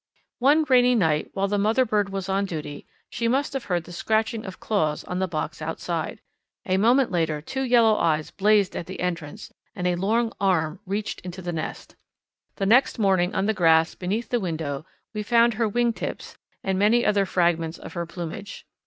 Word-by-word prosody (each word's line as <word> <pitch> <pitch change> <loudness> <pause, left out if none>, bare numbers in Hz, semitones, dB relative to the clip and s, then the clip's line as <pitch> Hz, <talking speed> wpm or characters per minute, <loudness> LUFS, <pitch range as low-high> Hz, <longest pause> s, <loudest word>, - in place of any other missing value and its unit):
One 290 +5 +4
rainy 250 -1 +5
night 160 -8 +1
while 195 0 +1
the 205 +1 0
mother 225 +6 +3
bird 210 -3 0
was 195 -1 -4
on 195 +1 0
duty 150 -5 -6 0.2
she 230 - -1
must 270 +5 0
have 270 -3 -4
heard 175 -3 -1
the 175 - -12
scratching 220 +4 -1
of 190 - -8
claws 155 -9 0
on 180 - -4
the 190 - 0
box 155 -2 -4
outside. 165 +1 -4 0.4
A 185 -3 +1
moment 240 +5 +3
later 160 -4 0
two 265 - -5
yellow 235 -4 +4
eyes 155 -2 0
blazed 205 -1 +2
at 170 - -5
the 190 - -7
entrance 175 +2 -4 0.2
and 180 -3 -4
a 180 - +2
long 220 +6 0
arm 180 -3 +1
reached 205 +2 -3
into 180 +1 -8
the 175 0 -3
nest. 155 - -6 0.6
The 195 - -2
next 245 +8 +4
morning 190 -4 +2
on 190 - +1
the 220 - +2
grass 165 -4 +4
beneath 205 +6 -3
the 245 - +1
window 160 -6 -4 0.3
we 215 - -3
found 235 +2 +3
her 220 0 0
wing 240 +2 +1
tips - - -6 0.3
and 190 -1 0
many 225 +4 +3
other 200 -2 +2
fragments 170 -2 +1
of - - -10
her 170 -1 -4
plumage. 175 +4 -7
195 Hz, 195 wpm, -24 LUFS, 170-220 Hz, 0.6 s, rainy